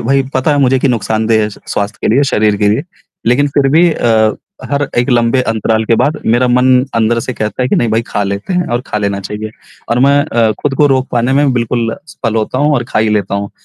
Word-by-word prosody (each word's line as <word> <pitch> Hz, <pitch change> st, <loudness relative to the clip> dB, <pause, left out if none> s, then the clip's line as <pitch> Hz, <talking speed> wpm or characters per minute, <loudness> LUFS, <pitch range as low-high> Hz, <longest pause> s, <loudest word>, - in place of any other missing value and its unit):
भई, 135 Hz, +3 st, +1 dB
पता 130 Hz, +4 st, +1 dB
है 145 Hz, -, +1 dB
मुझे 130 Hz, -1 st, +3 dB
कि 140 Hz, -, +1 dB
नुकसानदेह 110 Hz, -1 st, 0 dB
है 105 Hz, -, -1 dB
स -, -, -13 dB
स्वास्थ्य 105 Hz, +1 st, -3 dB
के -, -, 0 dB
लिए, 140 Hz, -, +3 dB
शरीर 105 Hz, -6 st, +1 dB
के 105 Hz, 0 st, +1 dB
लिए, 110 Hz, +7 st, +1 dB, 0.4 s
लेकिन 140 Hz, +5 st, +2 dB
फिर 140 Hz, -1 st, +3 dB
भी 170 Hz, +2 st, +5 dB
अ, 110 Hz, -4 st, +2 dB, 0.4 s
हर 145 Hz, 0 st, 0 dB
एक 120 Hz, +3 st, +1 dB
लंबे 120 Hz, +1 st, +2 dB
अंतराल 110 Hz, -1 st, -1 dB
के 115 Hz, -, +2 dB
बाद 150 Hz, +2 st, -1 dB
मेरा 120 Hz, +3 st, +2 dB
मन 125 Hz, +1 st, +4 dB, 0.2 s
अंदर 115 Hz, +1 st, +1 dB
से 125 Hz, -, -4 dB
कहता 110 Hz, +4 st, -3 dB
है 125 Hz, -, 0 dB
कि -, -, +1 dB
नहीं 120 Hz, -, +1 dB
भई 110 Hz, +1 st, +1 dB
खा 105 Hz, -, -2 dB
लेते 100 Hz, -, -4 dB
हैं 180 Hz, -1 st, 0 dB
और 120 Hz, -, 0 dB
खा 105 Hz, -, -2 dB
लेना 100 Hz, -1 st, -2 dB
चाहिए, 105 Hz, +2 st, -6 dB, 0.4 s
और 120 Hz, -, +1 dB
मैं 140 Hz, +2 st, +4 dB
अ, 115 Hz, -7 st, +1 dB
खुद 145 Hz, -2 st, 0 dB
को 150 Hz, -, +4 dB
रोक 130 Hz, -1 st, +1 dB
पाने 120 Hz, +2 st, +1 dB
में 140 Hz, 0 st, +2 dB
बिल्कुल 115 Hz, -1 st, -1 dB
असफल 115 Hz, -7 st, -5 dB
होता 110 Hz, +3 st, -1 dB
हूँ 150 Hz, +2 st, +2 dB
और 125 Hz, -3 st, 0 dB
खा -, -, -1 dB
ही 110 Hz, -, +2 dB
लेता 100 Hz, -2 st, -1 dB
हूँ। 100 Hz, 0 st, -3 dB
120 Hz, 250 wpm, -13 LUFS, 110-135 Hz, 0.4 s, भी